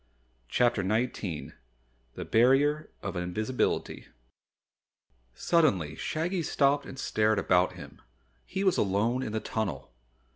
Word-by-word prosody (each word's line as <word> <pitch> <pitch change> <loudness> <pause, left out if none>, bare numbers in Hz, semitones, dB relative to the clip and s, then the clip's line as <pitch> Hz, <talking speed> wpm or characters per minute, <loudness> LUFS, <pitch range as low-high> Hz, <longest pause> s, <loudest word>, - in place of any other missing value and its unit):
CHAPTER 120 - +2
19 105 -4 -2 0.6
The - - -6
Barrier 135 +6 +3
of - - -4
Invisibility 100 +8 -2 1.3
Suddenly 100 - +2
Shaggy 170 +3 -2
stopped 145 -2 +1
and 135 - -9
stared 110 -4 +1
about 90 -2 +2
him. - - -12 0.4
He 190 +1 -4
was 190 -2 +3
alone 110 +6 +1
in 120 - -4
the 110 - -1
tunnel! 80 - -4
115 Hz, 110 wpm, -28 LUFS, 95-145 Hz, 1.3 s, Barrier